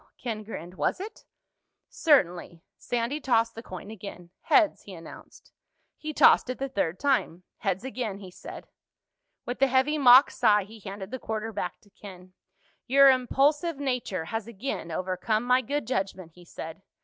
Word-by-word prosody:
Ken 225 -4 -4
grinned. 180 -5 -8
"Was - - 0
it?" 410 +4 -9 0.6
"Certainly." 180 - +1 0.2
Sandy 245 +5 -2
tossed 230 -3 +2
the 230 - -8
coin 185 -1 -9
again. 185 -5 -10
"Heads," 330 -2 +3
he 195 - -11
announced. 165 -1 -13 0.4
He 310 - -6
tossed 285 - +5
it 255 - -3
the 275 - -3
third 185 -8 -2
time. 255 - 0 0.2
"Heads 195 -1 -1
again," 245 -6 -4
he 190 -2 -11
said. - - -10 0.8
With 245 +2 -5
a 270 - +6
heavy 265 +4 +2
mock 255 0 +8
sigh 210 -5 +3
he 220 +3 -13
handed 195 0 -8
the 260 - -4
quarter 220 0 -4
back - - -4
to 205 - -25
Ken. 185 -3 -13 0.5
"Your 275 +1 +7
impulsive 285 +5 +1
nature 250 -11 -2
has 225 +4 -4
again 235 -5 -5
overcome 185 +6 -1
my 250 +1 +3
good 285 +2 -3
judgment," 190 -7 -3
he 175 0 -17
said. 160 +2 -9
225 Hz, 160 wpm, -27 LUFS, 190-265 Hz, 0.8 s, mock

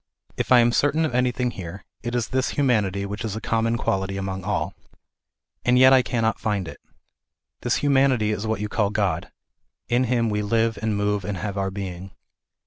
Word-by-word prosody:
If - - -3
I 125 -1 +8
am 120 0 +3
certain 150 +6 +2
of 155 - -3
anything 125 0 +1
here, 95 0 -8 0.2
it 120 0 -3
js 120 -3 -1
this 130 -1 +1
humanity 105 -8 +1
which 105 +2 -5
is 110 -2 -3
a - - -3
common 115 +1 0
quality 95 -2 -1
among 95 -1 -4
all, - - -2 0.9
And 125 +1 +3
yet 130 +1 +7
I 130 - +7
cannot 115 -3 -1
find 105 -5 -1
it. - - -10 0.8
This - - +1
humanity 135 -6 +3
is 105 +1 -3
what 110 -2 -1
you 105 - -1
call 105 -1 0
God. 100 -2 -1 0.3
" - - -53
In 125 +1 +2
Him 115 -2 +1
we 105 0 0
live 115 +1 +1
and 110 -2 0
move 105 0 0
and 95 +1 -3
have 100 +3 -4
our 95 -1 -1
being." 95 -1 -6
110 Hz, 200 wpm, -24 LUFS, 100-125 Hz, 0.9 s, I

